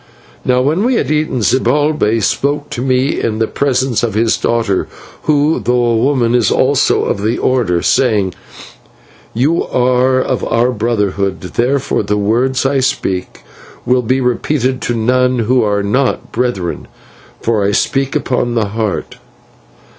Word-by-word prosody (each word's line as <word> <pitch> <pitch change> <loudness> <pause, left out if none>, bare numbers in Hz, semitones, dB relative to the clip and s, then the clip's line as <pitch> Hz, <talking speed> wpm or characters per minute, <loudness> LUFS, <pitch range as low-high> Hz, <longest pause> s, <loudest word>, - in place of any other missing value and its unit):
"Now 125 0 +2
when 155 +9 +1
we 250 +2 +2
had 155 - -1
eaten, 150 -6 0
Zibalbay 130 -1 +1
spoke 145 +7 -1
to 120 - -4
me 130 +1 0
in 110 -2 -1
the 110 - +1
presence 130 -2 0
of 115 -4 -2
his 110 +1 +2
daughter, 115 -5 0 0.4
who, 150 +1 +2
though 125 0 +1
a - - +1
woman, 120 -1 +1
is 120 -4 +3
also - - +2
of 100 - -2
the 110 +3 0
Order, 110 -10 0
saying: 105 -8 +1 1.0
"'You 145 +8 +1
are 125 +1 +2
of 130 -1 -1
our 120 +2 +1
Brotherhood, 105 -4 -1
therefore 125 +8 -1
the 105 - -1
words 120 +6 0
I 135 0 +2
speak 95 -8 -2 0.4
will 125 +1 +2
be 130 +3 0
repeated 130 +1 -1
to 120 - -2
none 125 +2 +1
who 120 +2 +2
are 105 -2 0
not 125 +6 -1
brethren, 115 -8 -2 0.5
for 110 -3 0
I 100 - +1
speak 135 +5 0
upon 120 -1 -1
the 110 -3 0
Heart.' 110 -1 -3
125 Hz, 150 wpm, -15 LUFS, 110-130 Hz, 1.0 s, is